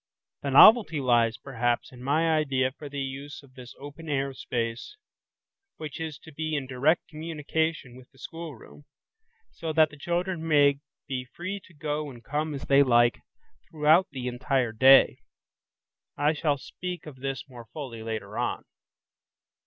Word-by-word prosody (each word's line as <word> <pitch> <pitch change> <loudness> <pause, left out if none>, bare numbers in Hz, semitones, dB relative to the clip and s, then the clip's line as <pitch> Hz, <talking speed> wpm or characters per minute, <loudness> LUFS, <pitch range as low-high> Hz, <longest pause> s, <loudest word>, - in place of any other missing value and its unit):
The 140 - -3
novelty 195 - +7
lies, 120 -3 +2
perhaps, 120 -3 -2
in 125 -1 -13
my 160 +5 +2
idea 135 -4 +1
for 145 +1 -10
the 140 0 -4
use 140 +2 -7
of 130 -2 -19
this 125 -1 -12
open 145 +3 -10
air 135 -1 -1
space, 120 - -4 0.8
which 155 0 -7
is 160 -2 -5
to 160 - -12
be 155 +1 -3
in 140 -2 -2
direct 135 +6 +1
communication 155 -3 -3
with 130 0 -15
the 135 - -26
schoolroom, 150 -2 -10 0.7
so 160 - -5
that 155 -1 +4
the 145 - -13
children 175 +1 -2
may 145 -2 +4 0.3
be 130 -3 -3
free 185 +9 -6
to 175 - -20
go 150 0 -3
and 120 -3 -12
come 150 +1 -2
as 135 - -7
they 140 0 +5
like, 120 -3 +4 0.5
throughout 160 +4 +4
the 125 -2 -6
entire 125 -1 0
day. 130 +4 +6 1.0
I 145 +2 +2
shall 150 -1 0
speak 180 +5 -7
of 150 -4 -10
this 135 +1 -5
more 120 -3 -12
fully 130 -7 -7
later 110 -2 -5
on. - - -2
140 Hz, 160 wpm, -27 LUFS, 130-155 Hz, 1.0 s, novelty